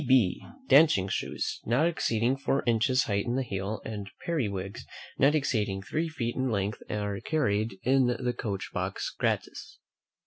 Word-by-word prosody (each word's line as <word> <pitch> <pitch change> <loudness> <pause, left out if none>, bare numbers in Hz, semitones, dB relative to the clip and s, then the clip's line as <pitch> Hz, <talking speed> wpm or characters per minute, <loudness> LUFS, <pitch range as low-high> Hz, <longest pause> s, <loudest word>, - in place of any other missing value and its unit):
N.B. 130 -9 +3 0.2
Dancing 140 - +6
shoes, - - -2
not 125 +8 +2
exceeding 125 -7 +1
four 135 0 0
inches 120 +3 +3
height 100 +1 -1
in 120 - 0
the 135 - +1
heel, 100 -1 -4
and 105 -3 -5 0.2
periwigs, 100 - -2 0.4
not 140 +3 +5
exceeding 105 -9 0
three 160 +9 -2
feet 120 -7 -3
in 130 0 0
length, 100 -1 -1
are 105 -1 -2
carried 110 -9 0
in 130 0 +4
the 125 0 -1
coach 100 -5 -4
box - - -3
gratis. - - -2
115 Hz, 150 wpm, -29 LUFS, 100-135 Hz, 0.4 s, Dancing